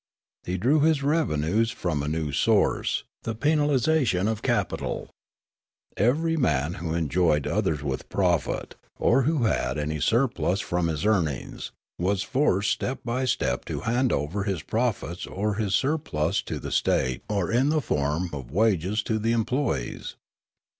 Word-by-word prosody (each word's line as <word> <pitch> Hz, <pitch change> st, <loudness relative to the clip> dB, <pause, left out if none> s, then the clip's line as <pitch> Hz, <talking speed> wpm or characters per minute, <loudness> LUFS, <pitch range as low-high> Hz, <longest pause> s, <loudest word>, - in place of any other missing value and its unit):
He 90 Hz, +1 st, -1 dB
drew 130 Hz, -, +3 dB
his 150 Hz, -1 st, +3 dB
revenues 115 Hz, -, +1 dB
from 90 Hz, -10 st, -2 dB
a 70 Hz, -, -3 dB
new 80 Hz, -1 st, -1 dB
source, 70 Hz, -, +2 dB, 0.2 s
the 115 Hz, -, -4 dB
penalisation 145 Hz, -, +2 dB
of 110 Hz, -1 st, -1 dB
capital. 120 Hz, -6 st, -1 dB, 0.8 s
Every 155 Hz, -, +2 dB
man 75 Hz, -, +1 dB
who 80 Hz, -2 st, -2 dB
employed 80 Hz, -2 st, +2 dB
others 75 Hz, -2 st, 0 dB
with 65 Hz, -3 st, -4 dB
profit, 90 Hz, -5 st, 0 dB, 0.2 s
or 135 Hz, -, +3 dB
who 155 Hz, +5 st, +1 dB
2IO -, -, 0 dB
Riallaro 95 Hz, -, +1 dB
had 70 Hz, -, -3 dB
any 75 Hz, +1 st, -2 dB
surplus 115 Hz, -, +1 dB
from 85 Hz, -3 st, -1 dB
his 80 Hz, +2 st, -2 dB
earnings, 85 Hz, -, -1 dB, 0.3 s
was 95 Hz, +3 st, +1 dB
forced 105 Hz, -5 st, +1 dB
step 130 Hz, -, -2 dB
by 125 Hz, +2 st, -1 dB
step 65 Hz, -, 0 dB
to -, -, -4 dB
hand 120 Hz, +2 st, +1 dB
over 85 Hz, +8 st, -1 dB
his 95 Hz, -8 st, -2 dB
profits 110 Hz, -, -2 dB
or 105 Hz, +2 st, -1 dB
his 100 Hz, -2 st, +1 dB
surplus 140 Hz, -, 0 dB
to -, -, -4 dB
the -, -, -6 dB
state 65 Hz, -1 st, +1 dB
or 100 Hz, -5 st, 0 dB
in 130 Hz, +5 st, +3 dB
the 155 Hz, 0 st, +2 dB
form 80 Hz, -, -1 dB
of 65 Hz, -4 st, -6 dB
wages 100 Hz, -, +1 dB
to 110 Hz, -1 st, -1 dB
the 115 Hz, +2 st, +1 dB
employees. 115 Hz, -, -1 dB
100 Hz, 155 wpm, -26 LUFS, 80-125 Hz, 0.8 s, drew